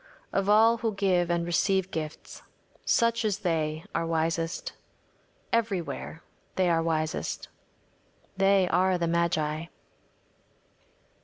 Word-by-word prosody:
Of 195 Hz, 0 st, +1 dB
all 225 Hz, +2 st, +6 dB
who 225 Hz, -2 st, -2 dB
give 185 Hz, -3 st, +2 dB
and 170 Hz, -1 st, 0 dB
receive 190 Hz, +2 st, +1 dB
gifts, 155 Hz, -1 st, -6 dB, 0.4 s
such 230 Hz, -1 st, +2 dB
as 210 Hz, -3 st, 0 dB
they 155 Hz, -2 st, -1 dB
are 165 Hz, 0 st, -1 dB
wisest. 165 Hz, -, -1 dB, 0.8 s
Everywhere 195 Hz, -7 st, -2 dB, 0.3 s
they 185 Hz, -2 st, +2 dB
are 165 Hz, -1 st, +2 dB
wisest. 160 Hz, 0 st, -2 dB, 0.9 s
They 195 Hz, -1 st, +4 dB
are 185 Hz, +1 st, +3 dB
the 170 Hz, -, 0 dB
magi. 165 Hz, -2 st, 0 dB
175 Hz, 105 wpm, -28 LUFS, 165-195 Hz, 0.9 s, all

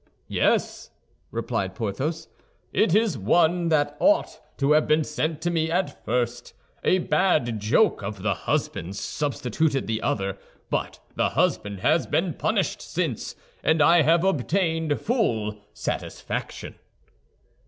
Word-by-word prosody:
"Yes," -, -, 0 dB, 0.4 s
replied 95 Hz, -1 st, -3 dB
Porthos, 140 Hz, -, -3 dB, 0.5 s
"it 195 Hz, -2 st, +3 dB
is 220 Hz, -3 st, +3 dB
the 125 Hz, -, -7 dB
one 170 Hz, -, +3 dB
that 150 Hz, -2 st, +1 dB
ought 305 Hz, +2 st, +2 dB, 0.2 s
to 140 Hz, +1 st, +1 dB
have 155 Hz, 0 st, +4 dB
been 155 Hz, +1 st, +3 dB
sent 155 Hz, +1 st, -2 dB
to 175 Hz, -, +1 dB
me 160 Hz, -1 st, 0 dB
at 180 Hz, +3 st, -2 dB
first. 120 Hz, +1 st, -2 dB, 0.3 s
A 185 Hz, -, +4 dB
bad 155 Hz, -, +1 dB
joke 110 Hz, -, +2 dB
of 100 Hz, -1 st, -6 dB
the -, -, +2 dB
husband's 95 Hz, +4 st, -2 dB
substituted 140 Hz, 0 st, -1 dB
the 110 Hz, 0 st, -2 dB
other; 95 Hz, 0 st, -1 dB, 0.3 s
but -, -, -2 dB, 0.2 s
the -, -, +2 dB
husband 100 Hz, -2 st, 0 dB
has -, -, +2 dB
been -, -, 0 dB
punished -, -, -1 dB
since, -, -, -3 dB, 0.3 s
and 160 Hz, 0 st, +3 dB
I 165 Hz, +3 st, +6 dB
have 165 Hz, +3 st, +4 dB
obtained 160 Hz, -2 st, +1 dB
full 110 Hz, -, 0 dB
satisfaction." -, -, -5 dB
150 Hz, 130 wpm, -25 LUFS, 110-170 Hz, 0.5 s, I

